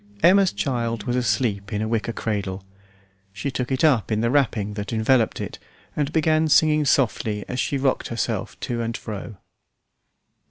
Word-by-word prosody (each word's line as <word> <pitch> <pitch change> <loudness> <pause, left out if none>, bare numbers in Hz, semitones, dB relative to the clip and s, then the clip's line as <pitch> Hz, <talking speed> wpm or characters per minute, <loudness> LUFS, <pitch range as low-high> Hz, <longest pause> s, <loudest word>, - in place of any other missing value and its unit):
Emma's 190 +1 +6
child 115 0 -2
was 120 - -1
asleep 105 -4 0
in 105 - -1
a 110 - -1
wicker 115 +1 -1
cradle. 100 -4 -3 0.7
She 100 +8 -3
took 125 0 -3
it 130 - 0
up 130 -9 +3
in 110 0 +1
the 115 +1 +1
wrapping 115 -7 +1
that 105 0 -5
enveloped 115 +1 +2
it - - -6 0.4
and 145 0 -1
began 160 0 +2
singing 155 0 +4
softly 110 -6 +1
as 125 - -4
she 140 - 0
rocked 135 -1 0
herself 115 -3 -3
to 120 -2 -2
and 115 0 -3
fro. 105 -1 -7
115 Hz, 165 wpm, -23 LUFS, 105-135 Hz, 0.7 s, Emma's